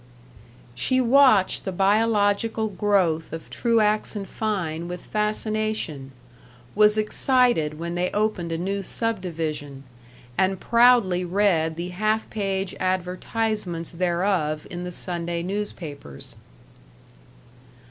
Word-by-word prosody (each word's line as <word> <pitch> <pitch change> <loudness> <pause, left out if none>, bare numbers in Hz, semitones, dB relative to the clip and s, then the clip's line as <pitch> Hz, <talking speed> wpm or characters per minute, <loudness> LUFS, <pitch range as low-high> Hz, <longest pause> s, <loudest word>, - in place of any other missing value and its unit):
She 255 - +1
watched 255 -5 +4
the 190 - -3
biological 210 +2 +2
growth 185 -5 +1
of 165 0 -8
Truax 215 -2 +1
& - - -9
Fein 175 -7 -3
with 180 0 -7
fascination; 215 -9 -2 0.6
was 210 +1 +4
excited 215 - +2
when 170 +1 -4
they 180 +1 0
opened 205 -5 -1
a 165 - -1
new 195 +3 -2
subdivision, 160 - -3 0.6
and 190 0 +2
proudly 235 -7 +4
read 175 -4 +1
the 170 +2 -4
half 215 +4 0
page 195 -3 -2
advertisements 185 0 -2
thereof 175 -3 0
in 175 0 -5
the 180 - -5
Sunday 170 -1 -3
newspapers. 170 - -6
190 Hz, 105 wpm, -24 LUFS, 170-215 Hz, 0.6 s, watched